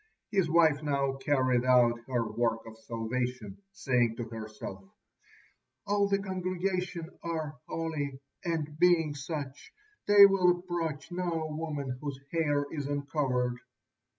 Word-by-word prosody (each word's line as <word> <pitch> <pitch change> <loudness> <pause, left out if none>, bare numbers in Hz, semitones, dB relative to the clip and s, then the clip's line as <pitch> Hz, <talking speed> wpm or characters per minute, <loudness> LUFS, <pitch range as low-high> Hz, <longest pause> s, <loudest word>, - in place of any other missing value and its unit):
His 190 -5 +2
wife 160 -3 +4
now 140 -2 0
carried 130 -3 +2
out 120 -2 +4
her 120 -3 0
work 115 -1 0
of 110 -1 -10
salvation, 115 -2 -4
saying 120 +3 +1
to 120 - -4
herself: 110 -3 -7 1.0
"All 205 0 +2
the 200 0 +2
congregation 185 -2 -2
are 155 -4 -4
holy, 150 -5 -3 0.2
and 155 -3 -3
being 170 -4 +4
such, 145 -1 -6 0.4
they 205 -1 +10
will 185 -3 +4
approach 170 -3 -4
no 175 -3 -1
woman 145 -5 -4
whose 140 -3 -4
hair 145 -4 +1
is 145 -3 -3
uncovered." 135 -4 -1
145 Hz, 125 wpm, -30 LUFS, 125-170 Hz, 1.0 s, they